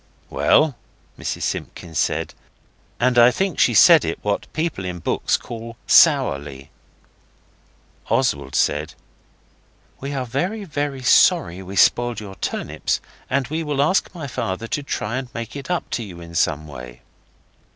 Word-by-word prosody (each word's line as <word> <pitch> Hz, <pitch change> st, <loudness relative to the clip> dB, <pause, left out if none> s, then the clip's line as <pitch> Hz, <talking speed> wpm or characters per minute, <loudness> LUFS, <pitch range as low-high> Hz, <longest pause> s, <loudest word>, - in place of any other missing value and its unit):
'Well?' 120 Hz, -, +3 dB, 0.4 s
Mrs -, -, -4 dB
Simpkins 85 Hz, -3 st, -4 dB
said, -, -, -1 dB, 0.7 s
and 125 Hz, 0 st, +3 dB
I 120 Hz, +1 st, +8 dB
think 190 Hz, +5 st, -2 dB
she 120 Hz, -, +4 dB
said 165 Hz, -, +8 dB
it 80 Hz, -, -2 dB
what 105 Hz, -1 st, -2 dB
people 160 Hz, -, -2 dB
in 90 Hz, -1 st, -4 dB
books 85 Hz, -, 0 dB
call 115 Hz, -1 st, -9 dB
'sourly'. 70 Hz, 0 st, +3 dB, 1.4 s
Oswald 70 Hz, -1 st, 0 dB
said, 75 Hz, +2 st, 0 dB, 1.0 s
'We 140 Hz, +1 st, -5 dB
are 130 Hz, -2 st, -2 dB
very, 180 Hz, -, -2 dB
very 145 Hz, -6 st, -3 dB
sorry 90 Hz, -6 st, +4 dB
we 95 Hz, +1 st, -8 dB
spoiled 120 Hz, +3 st, +3 dB
your 100 Hz, -3 st, -8 dB
turnips, -, -, -2 dB, 0.3 s
and 130 Hz, 0 st, 0 dB
we 160 Hz, +2 st, -2 dB
will 150 Hz, -3 st, -3 dB
ask 155 Hz, +7 st, +2 dB
my 160 Hz, -4 st, -6 dB
father 115 Hz, -5 st, -3 dB
to 145 Hz, -, -1 dB
try 115 Hz, -4 st, -3 dB
and 130 Hz, -1 st, -5 dB
make 115 Hz, +1 st, -6 dB
it 140 Hz, +2 st, -7 dB
up 180 Hz, -1 st, -1 dB
to 120 Hz, -, -2 dB
you 85 Hz, -4 st, -10 dB
some 80 Hz, -2 st, +1 dB
other 75 Hz, -, -11 dB
way. 60 Hz, -1 st, -10 dB
120 Hz, 150 wpm, -21 LUFS, 85-140 Hz, 1.4 s, I